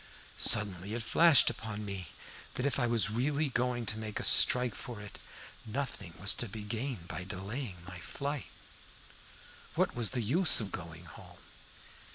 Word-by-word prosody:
Suddenly 105 -1 +3
it 120 - -3
flashed 165 +3 +6
upon 105 -2 -6
me 95 -4 -5 0.5
that, 125 - -1
if 140 - 0
I 120 - +2
was 115 -3 +3
really 140 +6 0
going 120 -1 -1
to 110 +1 -3
make 110 -1 -4
a - - -4
strike 125 -3 +5
for 120 -1 -7
it, 105 -1 -10 0.4
nothing 115 -7 -5
was 100 +2 +4
to 120 - -3
be 105 +1 -7
gained 110 -3 -4
by 90 - -5
delaying 100 +3 -5
my 90 -2 -8
flight. 140 - -4 1.3
What - - +1
was 120 -3 +2
the 125 -3 -2
use 160 - +4
of 105 -4 -4
going 85 0 -8
home? 85 - -13
110 Hz, 165 wpm, -32 LUFS, 100-125 Hz, 1.3 s, flashed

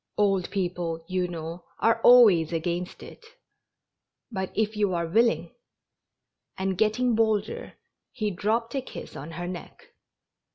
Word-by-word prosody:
" - - -48
Old 195 -3 +2
people, 175 -4 -3
you 185 -1 0
know, 170 0 -6
are 230 0 +2
always 210 -11 +7
against 175 +2 -3
it; - - -12 1.1
but 190 -3 -3
if 220 0 0
you 205 -3 +1
are 170 0 0
wil 220 +9 +4
ling 230 - -2 0.5
" - - -50
And, 190 0 -1
getting 220 +5 +2
bolder, 220 -2 0 0.4
he 215 -4 -2
dropped 225 +5 -1
a 270 - -1
kiss - - -9
on 155 +4 -8
her 175 +2 -5
neck. 175 -2 -9
190 Hz, 150 wpm, -26 LUFS, 175-220 Hz, 1.1 s, always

